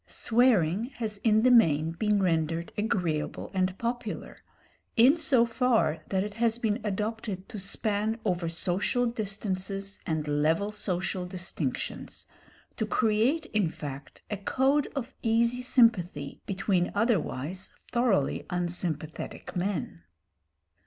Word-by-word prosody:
Swearing 220 -5 +2
has 215 -3 -4
in 220 0 +3
the 255 - +6
main 160 -9 +5
been 205 +3 +1
rendered 165 -1 0
agreeable 180 -8 -1
and 185 0 0
popular 235 -2 -4 0.6
in 250 +6 +7
so 265 -8 +3
far 230 - +2
that 190 -1 +1
it 205 0 -5
has 230 +1 +1
been 220 -3 -1
adopted 210 -1 -3
to 210 - -6
span 210 +3 -1
over 175 -4 0
social 185 +9 +2
distances 195 -3 -3
and 155 -2 -1
level 160 +7 +1
social 185 -2 -2
distinctions, 175 -7 -4 0.5
to 220 - 0
create 235 +9 +2
in 205 -6 +2
fact 140 -3 -8
a 210 - -1
code 270 +8 +1
of 265 -1 -4
easy 235 +2 +2
sympathy 185 - +2
between 190 -2 0
otherwise 185 - -1 0.2
thoroughly 225 - +1
unsympathetic 175 -3 -3
men. 180 - -2
200 Hz, 120 wpm, -28 LUFS, 175-230 Hz, 0.6 s, in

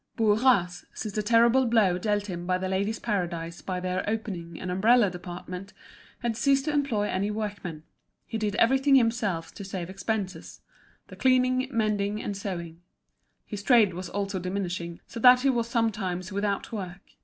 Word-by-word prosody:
Bourras, 215 -5 +3
since 215 -2 -5
the 215 - 0
terrible 235 +4 +4
blow 205 -6 +3
dealt 205 +1 0
him 175 -3 -6
by 185 0 +2
The 185 0 -3
Ladies' 200 +4 -1
Paradise 170 -5 -3
by 185 -1 -3
their 185 0 -2
opening 180 -7 -4
an 185 - -4
umbrella 210 +2 +4
department, 180 +2 -8 0.5
had 235 -2 0
ceased 275 +4 +2
to 305 - 0
employ 275 -8 +1
any 200 0 -1
workwomen. 205 -7 -5 0.4
He 225 - -4
did 210 -1 -1
everything 270 +5 +4
himself 225 -9 +1
to 200 - -8
save 190 -2 -5
expenses—the 195 0 -6
cleaning, 255 0 +3
mending, 210 -3 0
and 205 - -4
sewing. 170 -4 -6 0.6
His 205 -2 -6
trade 215 -4 +5
was 180 0 -6
also 200 -1 -2
diminishing, 180 -2 -4
so 235 - -8
that 250 +1 +7
he 270 0 +3
was 235 -2 -1
sometimes 205 -6 -1
without 200 0 -2
work. 190 -4 -6
205 Hz, 160 wpm, -27 LUFS, 185-230 Hz, 0.6 s, that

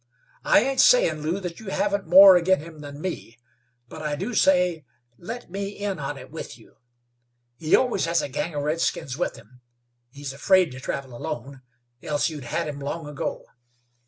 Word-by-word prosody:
I - - +5
ain't 265 +2 -1
sayin', - - +5
Lew, 165 +6 -1
that 175 -2 -6
you 220 - -12
haven't 200 0 -1
more 190 +1 +9
agin 185 +2 +3
him 160 -1 -12
than 145 0 -9
me, 160 -10 -6 0.5
but 155 - -10
I 150 -1 -2
do 245 +11 -4
say, 180 -5 +3 0.4
let 230 +2 -8
me 195 +1 -3
in 200 -4 -3
on 140 0 -4
it 130 0 -12
with 160 - -8
you. 115 - -21 0.8
He 155 -1 +3
always 245 -6 +1
has 170 -1 +1
a - - -2
gang 150 +4 -4
of 145 - -2
redskins 150 -4 -1
with 175 - -2
him; 125 +4 -18 0.5
he's 140 +1 -7
afraid 185 +4 +3
to 130 - -9
travel 130 -1 -5
alone, 130 +3 -6 0.4
else 145 +1 0
you'd 150 -5 -8
had 165 +7 -2
him 145 -1 -6
long 145 +3 -5
ago. 150 -1 -5
160 Hz, 185 wpm, -24 LUFS, 140-190 Hz, 0.8 s, more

